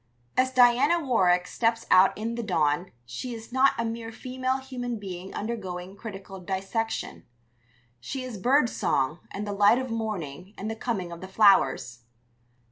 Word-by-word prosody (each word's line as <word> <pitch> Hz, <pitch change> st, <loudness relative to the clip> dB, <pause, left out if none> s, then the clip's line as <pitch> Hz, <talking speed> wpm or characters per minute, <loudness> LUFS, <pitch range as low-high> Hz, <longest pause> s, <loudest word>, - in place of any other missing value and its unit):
As 260 Hz, 0 st, +3 dB
Diana 255 Hz, +6 st, +5 dB
Warwick 185 Hz, -, +3 dB
steps 230 Hz, +2 st, 0 dB
out 185 Hz, +1 st, +6 dB
in 225 Hz, +2 st, -3 dB
the 235 Hz, -, -3 dB
dawn 170 Hz, -4 st, 0 dB
she 230 Hz, -, -5 dB
is 225 Hz, +1 st, -11 dB
not 265 Hz, +1 st, +5 dB
a 230 Hz, -, -1 dB
mere 225 Hz, 0 st, -4 dB
female 255 Hz, +2 st, -2 dB
human 250 Hz, -3 st, -5 dB
being 190 Hz, -2 st, -7 dB
undergoing 190 Hz, -4 st, -5 dB
critical 195 Hz, -2 st, -8 dB
dissection; 195 Hz, +5 st, -3 dB, 0.8 s
she 255 Hz, -, -5 dB
is 245 Hz, -6 st, -6 dB
bird 255 Hz, +5 st, +4 dB
song 150 Hz, -, 0 dB
and 205 Hz, +1 st, -5 dB
the 205 Hz, -, -3 dB
light 205 Hz, +3 st, +5 dB
of 260 Hz, -2 st, -3 dB
morning 195 Hz, -5 st, -4 dB
and 215 Hz, +3 st, -4 dB
the -, -, -4 dB
coming 210 Hz, -7 st, -3 dB
of 170 Hz, -, -8 dB
the 190 Hz, -, -7 dB
flowers. 190 Hz, -, +3 dB
220 Hz, 160 wpm, -27 LUFS, 185-245 Hz, 0.8 s, out